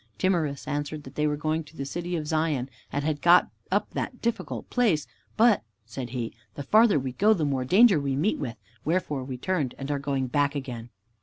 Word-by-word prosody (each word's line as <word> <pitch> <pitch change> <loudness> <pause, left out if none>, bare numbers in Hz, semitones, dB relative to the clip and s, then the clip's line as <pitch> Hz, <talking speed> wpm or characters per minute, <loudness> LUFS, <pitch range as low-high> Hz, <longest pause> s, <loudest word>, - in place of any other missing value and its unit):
Timorous 160 -7 0
answered 145 +1 -3
that 130 - -11
they 150 0 +1
were 150 0 0
going 155 +2 -1
to 155 +1 -17
the 140 - -3
City 175 +4 -3
of 155 -2 -2
Zion 150 -4 0 0.2
and 145 - -1
had 150 -2 -1
got 175 +1 +6 0.2
up - - +1
that - - -4
difficult 235 -1 -3
place. 210 - +2 0.3
"But," 225 -2 +5 0.2
said 120 +2 -6
he, 120 -2 -4 0.2
"the 140 - -5
farther 215 - +5
we 130 -2 -2
go, 210 - +4
the 160 -5 0
more 135 -3 0
danger 195 - +6
we 140 -1 -1
meet 165 +10 +1
with, 120 -2 -4 0.3
wherefore 150 -4 -1
we 130 -1 -5
turned 150 -3 -1
and 135 +1 -4
are 145 - 0
going 140 -1 -1
back 145 +3 +1
again." 125 -4 -5
145 Hz, 210 wpm, -27 LUFS, 135-175 Hz, 0.3 s, got